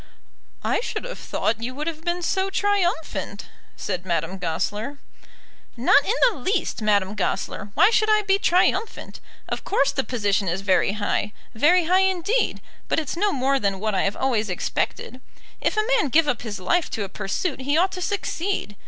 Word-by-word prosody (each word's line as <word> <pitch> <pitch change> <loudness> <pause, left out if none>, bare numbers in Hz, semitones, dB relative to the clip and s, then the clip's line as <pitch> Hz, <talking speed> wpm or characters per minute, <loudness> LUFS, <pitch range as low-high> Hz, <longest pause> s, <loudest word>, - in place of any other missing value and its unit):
"I - - +1
should - - -4
have - - -7
thought 225 +1 -1
you 250 +2 -4
would 300 +2 -4
have 320 -1 -4
been 350 +1 -1
so 380 +3 0
triumphant," 350 - -1 0.3
said 180 -3 -3
Madame 170 +1 -2
Goesler. 205 - -2 0.8
"Not 255 +4 +5
in 430 - 0
the 455 - -1
least, 370 - -1
Madame 205 -2 +2
Goesler. 205 +1 -2
Why 420 - +6
should 435 -1 +3
I 430 0 +4
be 395 0 +2
triumphant? 375 +4 +1 0.3
Of - - -4
course 280 -8 +2
the 270 - -1
position 205 -6 0
is 175 +3 -1
very 195 0 +2
high, 210 0 -1 0.2
very 340 +10 +4
high 365 +3 +4
indeed. 380 +7 0 0.2
But - - +1
it's 310 -1 -4
no 405 +4 +1
more 270 -2 +1
than 195 -4 -1
what 215 +1 -1
I 190 - +2
have 195 - -1
always 230 -5 0
expected. 250 +7 -3 0.4
If - - 0
a 430 - +2
man 430 - +1
give 315 +4 +4
up 250 -6 0
his 210 -5 -5
life 340 - +1
to 210 - -1
a - - -4
pursuit 210 - -3
he 285 +3 +1
ought 370 +3 +3
to 365 - -6
succeed. 375 - -2
275 Hz, 185 wpm, -23 LUFS, -, 0.8 s, Why